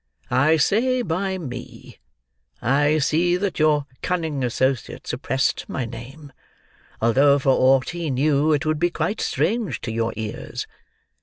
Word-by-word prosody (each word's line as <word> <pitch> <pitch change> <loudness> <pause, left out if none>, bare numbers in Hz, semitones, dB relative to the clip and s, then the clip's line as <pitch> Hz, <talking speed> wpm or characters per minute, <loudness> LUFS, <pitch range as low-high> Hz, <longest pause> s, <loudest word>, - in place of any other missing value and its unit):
I 155 +5 +4
say 245 - +2
by 190 +2 -2
me—I 120 - -3
see 170 +4 +2
that 195 -2 -2
your 150 -2 +3 0.2
cunning 160 -6 -2
associate 130 +1 -1
suppressed 135 +2 -1
my 130 - -2
name, 130 +6 -10 0.7
although 135 +5 +4
for 135 -1 +2
aught 130 0 +3
he 170 -2 -4
knew, 145 +3 +2
it 150 -1 +1
would 155 -1 0
be 175 - +2
quite 170 +5 -2
strange 220 - -1
to 115 - -4
your 115 0 -1
ears. 110 0 -5
145 Hz, 135 wpm, -22 LUFS, 125-165 Hz, 0.7 s, I